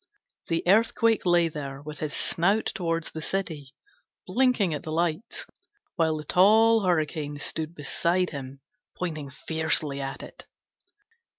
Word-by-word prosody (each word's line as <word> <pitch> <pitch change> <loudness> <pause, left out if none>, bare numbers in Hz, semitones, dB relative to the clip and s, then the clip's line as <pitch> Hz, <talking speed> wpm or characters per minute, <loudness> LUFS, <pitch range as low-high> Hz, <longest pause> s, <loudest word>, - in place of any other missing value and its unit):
The 165 +1 -1
Earthquake 225 +1 +3
lay 175 -1 +4
there, 140 -3 -6
with 150 +1 -9
his 155 0 -3
snout 195 +6 +1
towards 165 -5 -2
the 160 - -6
city, 155 -7 -4 0.5
blinking 250 -9 +2
at 150 - -3
the 155 - -6
lights, 170 +6 -2 0.5
while 160 -2 +1
the 150 - -6
tall 220 +7 +5
Hurricane 155 -5 -1
stood 160 +3 -3
beside 175 +4 0
him 135 -1 -8 0.4
pointing 155 -5 -4
fiercely 155 -1 -1
at 135 0 -5
it. - - -12
165 Hz, 130 wpm, -26 LUFS, 150-185 Hz, 0.5 s, tall